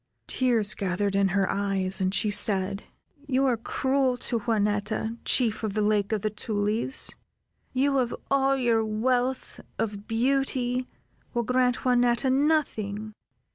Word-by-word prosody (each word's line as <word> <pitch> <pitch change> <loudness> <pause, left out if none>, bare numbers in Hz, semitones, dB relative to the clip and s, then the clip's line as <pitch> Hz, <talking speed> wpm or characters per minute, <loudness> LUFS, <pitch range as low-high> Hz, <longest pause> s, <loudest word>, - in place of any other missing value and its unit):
Tears 230 -5 +1
gathered 195 +1 -1
in 200 0 +3
her 195 0 +1
eyes, 195 -1 -1
and 185 0 +1
she 210 +1 +1
said: 195 -1 0 0.4
"You 270 0 +2
are 255 -3 +3
cruel 260 +2 0
to 235 -1 -2
Juanetta, 210 0 -1
Chief 230 -4 +1
of 215 -2 -2
the 215 - +1
Lake 205 -1 +1
of 215 -3 -1
the 215 - 0
Tulies. 215 +4 0 0.6
You 275 +1 +2
of 245 -2 -1 0.2
all 275 0 +3
your 235 -3 +2
wealth 245 +4 -1 0.2
of 205 -2 -3
beauty, 255 +1 0 0.5
will 240 - +1
grant 250 +1 +1
Juanetta 245 +1 +3
nothing. 220 -8 0
225 Hz, 135 wpm, -26 LUFS, 205-255 Hz, 0.6 s, in